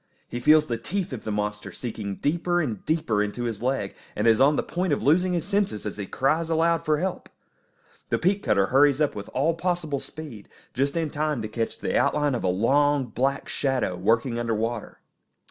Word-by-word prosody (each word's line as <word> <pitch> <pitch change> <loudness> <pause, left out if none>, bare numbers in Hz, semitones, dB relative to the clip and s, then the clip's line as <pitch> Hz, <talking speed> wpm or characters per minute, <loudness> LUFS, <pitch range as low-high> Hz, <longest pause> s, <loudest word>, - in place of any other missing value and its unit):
He 120 - -5
feels 150 +4 +5
the 115 -5 -3
teeth 180 +4 -3
of 125 - -7
the 110 - -2
monster 105 0 -3
sinking 110 -5 -5
deeper 170 - 0
and 120 - -2
deeper 155 -10 +1
into 105 +4 -2
his 115 -3 -3
leg, 125 -6 -1 0.2
and 105 - -1
is 115 0 +5
on 145 +2 +5
the - - 0
point 180 -2 -1
of - - -1
losing 180 +5 +3
his 170 - -1
senses 200 - -1
as 105 - -4
he 100 -2 -5
cries 155 +5 0
aloud 165 0 +2
for 155 -2 +2
help. 185 +3 -3 0.8
The - - +2
peat 195 +3 +1
cutter 100 -1 +2
hurries 140 +4 +4
up 150 -2 +2
with 100 -1 -7
all 150 +6 +1
possible 165 -4 -1
speed, 145 -11 -9 0.2
just 140 +4 0
in 160 -3 -1
time 150 -2 -1
to - - -2
catch 115 +1 -3
the - - -2
outline 145 -2 +2
of 120 - -2
a - - +1
long, 135 +8 +2
black 135 +5 -1
shadow, 130 -9 0
working 115 +6 +1
under 115 -1 -1
water. 115 +1 -4
135 Hz, 205 wpm, -25 LUFS, 110-160 Hz, 0.8 s, feels